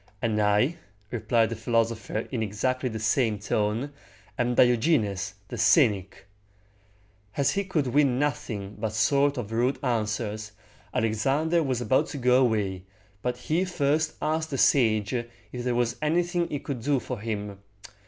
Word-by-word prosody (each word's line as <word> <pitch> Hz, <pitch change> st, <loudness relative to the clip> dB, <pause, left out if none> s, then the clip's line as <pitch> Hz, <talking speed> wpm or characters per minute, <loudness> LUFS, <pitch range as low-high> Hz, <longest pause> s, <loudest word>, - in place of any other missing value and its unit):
"And 110 Hz, -2 st, 0 dB
I," 105 Hz, +10 st, +2 dB, 0.3 s
replied 115 Hz, -1 st, +1 dB
the -, -, -2 dB
philosopher 115 Hz, -1 st, -1 dB
in 120 Hz, -4 st, -2 dB
exactly 125 Hz, +5 st, -1 dB
the 110 Hz, -, -5 dB
same 110 Hz, 0 st, +1 dB
tone, 105 Hz, +6 st, -1 dB, 0.4 s
"am 120 Hz, +1 st, 0 dB
Diogenes 110 Hz, -, +2 dB
the 120 Hz, -, -6 dB
cynic!" 105 Hz, -, +3 dB, 1.1 s
As 140 Hz, -1 st, +3 dB
he 200 Hz, -, 0 dB
could 175 Hz, -7 st, -1 dB
win 135 Hz, 0 st, +2 dB
nothing 125 Hz, -9 st, -3 dB
but 110 Hz, -1 st, -2 dB
short 140 Hz, +6 st, +2 dB
or 125 Hz, -, -1 dB
rude 115 Hz, +5 st, 0 dB
answers, 110 Hz, -3 st, -2 dB, 0.4 s
Alexander 135 Hz, +10 st, +1 dB
was 130 Hz, -5 st, -1 dB
about 120 Hz, +3 st, +2 dB
to -, -, -6 dB
go 125 Hz, 0 st, +4 dB
away, 105 Hz, -6 st, 0 dB, 0.4 s
but 125 Hz, 0 st, -2 dB
he 160 Hz, +7 st, 0 dB
first 155 Hz, -3 st, 0 dB
asked 160 Hz, +1 st, 0 dB
the 135 Hz, -, -3 dB
sage 110 Hz, -7 st, +3 dB
if 120 Hz, -1 st, -2 dB, 0.4 s
there 125 Hz, -1 st, 0 dB
was 120 Hz, -1 st, 0 dB
anything 175 Hz, +3 st, +1 dB
he 145 Hz, -, -2 dB
could 135 Hz, -3 st, -5 dB
do 140 Hz, +2 st, +1 dB
for 125 Hz, -2 st, -6 dB
him. 105 Hz, -2 st, -4 dB
120 Hz, 150 wpm, -26 LUFS, 110-140 Hz, 1.1 s, go